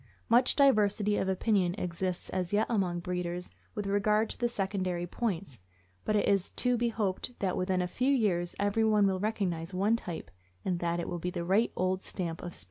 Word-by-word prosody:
Much 245 Hz, +2 st, +5 dB
diversity 210 Hz, -6 st, +4 dB
of 190 Hz, -, 0 dB
opinion 190 Hz, -2 st, +1 dB
exists 180 Hz, -1 st, -3 dB
as 180 Hz, -2 st, -2 dB
yet 210 Hz, +2 st, +3 dB
among 185 Hz, -6 st, 0 dB
breeders 180 Hz, 0 st, -3 dB, 0.2 s
with 210 Hz, -2 st, -3 dB
regard 210 Hz, +2 st, +2 dB
to -, -, -6 dB
the 240 Hz, -1 st, +1 dB
secondary 190 Hz, -4 st, -2 dB
points; 180 Hz, -, -3 dB, 0.5 s
but 215 Hz, -, +1 dB
it 205 Hz, -, +2 dB
is 195 Hz, -2 st, +2 dB
to 250 Hz, -1 st, 0 dB
be 240 Hz, 0 st, +1 dB
hoped 215 Hz, +2 st, -2 dB
that 190 Hz, -2 st, -1 dB
within 185 Hz, 0 st, 0 dB
a -, -, -1 dB
few 250 Hz, +9 st, 0 dB
years 190 Hz, -10 st, +1 dB
everyone 210 Hz, +1 st, +3 dB
will 190 Hz, -1 st, +1 dB
recognize 185 Hz, -5 st, -2 dB
one 205 Hz, +5 st, +3 dB
type, 175 Hz, -8 st, -6 dB, 0.3 s
and 180 Hz, -2 st, 0 dB
that 170 Hz, 0 st, 0 dB
it 170 Hz, -, -3 dB
will 175 Hz, -, -3 dB
be 180 Hz, -, -2 dB
the 170 Hz, -1 st, -4 dB
right 200 Hz, +6 st, +3 dB
old 185 Hz, +1 st, 0 dB
stamp 170 Hz, -4 st, -4 dB
of 175 Hz, -1 st, -7 dB
Spits. -, -, -5 dB
190 Hz, 200 wpm, -30 LUFS, 180-215 Hz, 0.5 s, Much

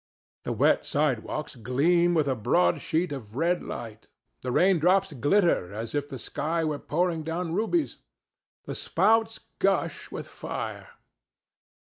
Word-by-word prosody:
The -, -, -2 dB
wet -, -, +3 dB
sidewalks 145 Hz, 0 st, -1 dB
gleam 165 Hz, +9 st, +2 dB
with 155 Hz, -3 st, +2 dB
a 135 Hz, -, +2 dB
broad 90 Hz, -6 st, +2 dB
sheet 165 Hz, +2 st, 0 dB
of 115 Hz, -6 st, -7 dB
red 170 Hz, +5 st, +1 dB
light. 115 Hz, -2 st, -8 dB, 0.3 s
The 125 Hz, -, -3 dB
raindrops 185 Hz, +3 st, +3 dB
glitter 145 Hz, -, +2 dB
as 115 Hz, +1 st, -5 dB
if 145 Hz, 0 st, -2 dB
the 135 Hz, -, -6 dB
sky 160 Hz, +7 st, -2 dB
were 150 Hz, -2 st, -2 dB
pouring 170 Hz, +1 st, 0 dB
down 165 Hz, +2 st, -3 dB
rubies. 225 Hz, -, 0 dB, 0.7 s
The -, -, -5 dB
spouts 225 Hz, 0 st, +2 dB, 0.2 s
gush -, -, 0 dB
with -, -, -6 dB
fire. -, -, -6 dB
155 Hz, 135 wpm, -27 LUFS, 130-180 Hz, 0.7 s, wet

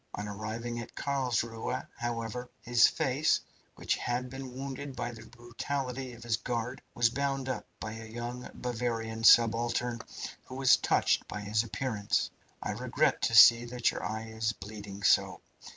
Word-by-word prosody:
On 105 Hz, -, -4 dB
arriving 110 Hz, +3 st, -4 dB
at 115 Hz, -, -8 dB
Carlsruhe, 125 Hz, -5 st, -1 dB
however, 120 Hz, +1 st, -3 dB
his 120 Hz, 0 st, +6 dB
face, 150 Hz, 0 st, +2 dB, 0.4 s
which -, -, -1 dB
had 125 Hz, +1 st, -2 dB
been 135 Hz, -1 st, -7 dB
wounded 135 Hz, +1 st, -6 dB
by 120 Hz, -1 st, -3 dB
the 115 Hz, -, -11 dB
brutality 125 Hz, +2 st, -4 dB
of 120 Hz, 0 st, -12 dB
his 115 Hz, -1 st, +1 dB
guard, 125 Hz, +1 st, -3 dB
was 120 Hz, -1 st, +3 dB
bound 135 Hz, 0 st, -1 dB
up 125 Hz, -5 st, -3 dB
by 110 Hz, -, -5 dB
a 110 Hz, 0 st, -8 dB
young 120 Hz, +2 st, -6 dB
Bavarian 115 Hz, -2 st, -3 dB
subaltern 115 Hz, +1 st, +4 dB, 0.4 s
who 130 Hz, -, -9 dB
was 135 Hz, -1 st, +6 dB
touched -, -, +2 dB
by 105 Hz, -, -5 dB
his 105 Hz, +1 st, +1 dB
appearance. 115 Hz, -3 st, -1 dB, 0.3 s
I -, -, -2 dB
regret -, -, +1 dB
to -, -, +1 dB
see 115 Hz, 0 st, +10 dB
that 120 Hz, 0 st, +1 dB
your -, -, -6 dB
eye 110 Hz, +1 st, -4 dB
is 110 Hz, 0 st, -1 dB
bleeding 100 Hz, -1 st, -9 dB
so. -, -, +4 dB
120 Hz, 155 wpm, -30 LUFS, 110-125 Hz, 0.4 s, see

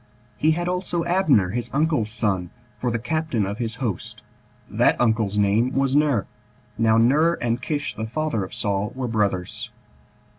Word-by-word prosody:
He 155 Hz, +1 st, +2 dB
had 175 Hz, +2 st, -2 dB
also 180 Hz, -2 st, -1 dB
Abner, 160 Hz, -, +3 dB
his 120 Hz, +1 st, -3 dB
uncle's 150 Hz, -7 st, +1 dB
son, 100 Hz, -6 st, -1 dB, 0.3 s
for 125 Hz, -, 0 dB
the 115 Hz, -, 0 dB
captain 125 Hz, -2 st, -1 dB
of 100 Hz, +4 st, -5 dB
his 115 Hz, -2 st, -3 dB
host: 120 Hz, -7 st, -4 dB, 0.4 s
that -, -, +2 dB
uncle's 110 Hz, -4 st, +1 dB
name 105 Hz, +5 st, +2 dB
was 135 Hz, 0 st, +1 dB
Ner. 145 Hz, -8 st, +3 dB, 0.5 s
Now 110 Hz, 0 st, +3 dB
Ner, 145 Hz, +9 st, +4 dB
and 120 Hz, +1 st, -2 dB
Kish 145 Hz, +2 st, -2 dB
the 110 Hz, -, -4 dB
father 150 Hz, -4 st, -1 dB
of 95 Hz, -, -7 dB
Saul, 100 Hz, 0 st, -1 dB
were 130 Hz, -1 st, -3 dB
brothers. 100 Hz, -5 st, -1 dB
120 Hz, 160 wpm, -23 LUFS, 105-150 Hz, 0.5 s, Ner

